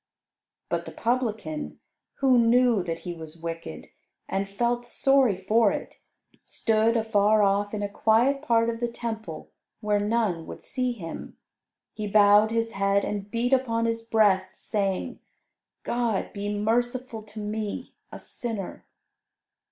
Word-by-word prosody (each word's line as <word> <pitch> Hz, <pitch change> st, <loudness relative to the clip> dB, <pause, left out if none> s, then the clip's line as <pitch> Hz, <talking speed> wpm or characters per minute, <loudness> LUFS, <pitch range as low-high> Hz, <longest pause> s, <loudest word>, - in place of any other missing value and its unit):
But -, -, -2 dB
the -, -, -7 dB
Publican, 220 Hz, -10 st, -2 dB, 0.4 s
who 260 Hz, -3 st, +4 dB
knew 235 Hz, -2 st, +4 dB
that 165 Hz, -2 st, -4 dB
he 175 Hz, -, -5 dB
was 160 Hz, -1 st, -10 dB
wicked, 165 Hz, -, -6 dB, 0.4 s
and 195 Hz, 0 st, -2 dB
felt 240 Hz, +4 st, 0 dB
sorry 265 Hz, -4 st, +3 dB
for 210 Hz, +3 st, +3 dB
it, -, -, -6 dB, 0.4 s
stood 225 Hz, +1 st, +1 dB
afar 215 Hz, -1 st, +3 dB
off 200 Hz, +1 st, +2 dB
in 210 Hz, -1 st, -3 dB
a -, -, 0 dB
quiet 225 Hz, +7 st, +2 dB
part 230 Hz, -6 st, +2 dB
of 230 Hz, -, -7 dB
the 240 Hz, -, 0 dB
Temple 225 Hz, -7 st, -6 dB, 0.3 s
where 210 Hz, -2 st, +1 dB
none 205 Hz, -6 st, 0 dB
would -, -, -9 dB
see 255 Hz, -1 st, -1 dB
him. 170 Hz, -8 st, -8 dB, 0.6 s
He 215 Hz, -1 st, -4 dB
bowed 205 Hz, +1 st, +6 dB
his 230 Hz, 0 st, -1 dB
head 200 Hz, 0 st, +1 dB
and 205 Hz, -1 st, -4 dB
beat 240 Hz, +4 st, 0 dB
upon 230 Hz, -3 st, +2 dB
his 230 Hz, 0 st, -1 dB
breast, 200 Hz, -5 st, +2 dB
saying, 195 Hz, -3 st, -2 dB, 0.6 s
"God 235 Hz, -5 st, -1 dB
be 205 Hz, 0 st, -3 dB
merciful 235 Hz, +3 st, -1 dB
to 215 Hz, 0 st, -11 dB
me 210 Hz, 0 st, -4 dB, 0.2 s
a -, -, -7 dB
sinner." 225 Hz, -6 st, -6 dB
215 Hz, 140 wpm, -26 LUFS, 200-235 Hz, 0.6 s, bowed